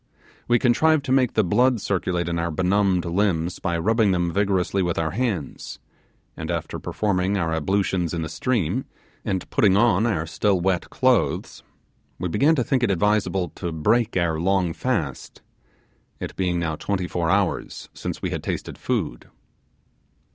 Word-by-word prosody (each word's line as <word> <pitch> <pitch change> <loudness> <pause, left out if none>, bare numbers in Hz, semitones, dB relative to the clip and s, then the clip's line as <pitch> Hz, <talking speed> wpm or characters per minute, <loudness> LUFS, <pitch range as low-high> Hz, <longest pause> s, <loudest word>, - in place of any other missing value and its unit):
We 120 - +4
contrived 145 +5 +3
to 130 - -2
make 130 -3 +3
the 110 - +4
blood 125 +6 +3
circulate 90 -3 -1
in 85 0 -1
our 85 0 -1
benumbed 95 +2 +1
limbs 85 -1 0
by 85 -2 -1
rubbing 110 +5 +2
them 90 -2 0
vigorously 100 -1 +1
with 85 -2 -1
our 80 -1 0
hands; 105 - -3 0.6
and - - -6
after - - -3
performing 100 -1 0
our 85 -3 0
ablutions 90 +1 0
in 85 -1 -2
the - - -3
stream, 105 - -1 0.4
and 95 -2 -2
putting 100 -2 +4
on 110 -1 +3
our 85 -8 0
still 95 +3 +1
wet 90 0 0
clothes, 130 -4 +1 0.6
we 90 - -3
began 145 - +3
to 130 - +1
think 130 +1 0
it 120 - +2
advisable 95 -2 +1
to 85 +1 -5
break 110 +8 +1
our 85 -3 +1
long 90 -1 +1
fast, 85 - -3 0.8
it - - -6
being 90 -2 0
now 85 -2 -1
twenty 95 +2 -2
four 85 -2 -1
hours 100 -1 -1
since - - -6
we - - -1
had - - -3
tasted - - -5
food. - - -3
95 Hz, 160 wpm, -23 LUFS, 85-110 Hz, 0.8 s, We